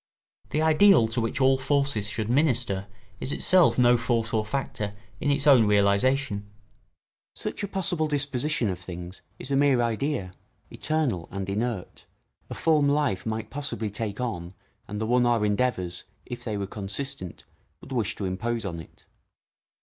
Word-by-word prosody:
The 155 - 0
ideal 160 - +6
to 115 +1 0
which 115 +4 -2
all 130 0 +4
forces 140 -7 +1
should 110 0 -3
minister 120 -7 +1 0.3
is 130 - -3
itself 180 +3 +4
no 120 -1 +5
force 115 -1 0
or 110 -1 +2
factor 105 -3 -3 0.2
in 145 - -1
its 140 0 +1
own 130 -7 +6
realisation. 105 +2 +2 0.9
Such - - -4
a 200 - -2
possible 185 -5 0
disposition 145 -4 0
of 90 -2 -3
things 90 0 -8 0.2
is 135 - -5
a - - +2
mere 140 -2 +4
idea, 115 -4 -1 0.4
eternal 140 - -1
and 95 -1 -5
inert, 105 0 -3 0.4
a - - -5
form 150 -3 +3
life 140 -9 0
might 110 -1 -3
possibly 135 -7 -3
take 105 0 -4
on 95 -7 -4 0.3
and 105 +1 -5
the 110 - -1
one 125 +1 +3
our 115 -3 +2
endeavours, 105 -5 -1 0.2
if 120 -1 -7
they 110 -3 -3
were 100 - -2
consistent, 100 -1 -4 0.4
would - - -14
wish 115 -4 -1
to 100 - -4
impose 115 +5 -2
on 85 -4 -4
it. 80 - -14
120 Hz, 160 wpm, -26 LUFS, 100-140 Hz, 0.9 s, ideal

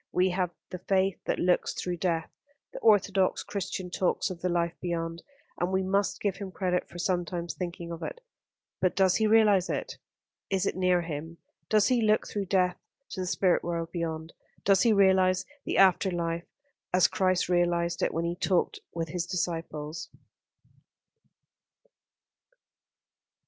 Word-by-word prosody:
We 185 +1 +2
have 180 -1 0 0.2
the 180 - -5
faith 190 +1 0
that - - 0
looks 180 0 +1
through 180 -1 -3
death. 165 -2 -1 0.4
The - - -6
orthodox 200 -3 +3
Christian 190 -2 -4
talks 185 +1 0
of 175 -2 -8
the 180 - 0
life 170 -1 0
beyond; 165 -1 -3 0.4
and 175 +1 0
we 190 0 +1
must 195 +1 0
give 200 -3 -1
him 200 -1 -6
credit 180 -1 -1
for 175 - -10
sometimes 175 -1 -2
thinking 170 -1 -5
of 170 0 -6
it - - -5 0.6
but 185 - +1
does 190 -2 +4
he 220 - +2
realise 210 -4 +4
it? - - -4 0.5
Is 195 0 0
it - - -1
near 180 -1 +2
him? 165 +1 -6 0.3
Does 215 +1 +4
he 250 -2 +3
look 215 -1 +2
through 205 -1 -3
death 180 -1 +1 0.3
to - - -6
the 185 - -2
Spirit 180 0 +2
world 170 -1 -3
beyond? 160 -2 -4 0.3
Does 195 -1 +5
he 235 - +4
realise 190 -2 +4 0.2
the - - -1
After 190 0 +5
life 170 -1 -2 0.4
as 180 -3 +5
Christ 185 -1 +1
realised 175 -1 +1
it - - +1
when 165 +1 -2
He 170 +1 -1
talked 185 0 0 0.2
with 165 -1 -2
His 170 +1 -3
disciples?" 165 -3 -3
180 Hz, 160 wpm, -28 LUFS, 170-190 Hz, 0.6 s, Does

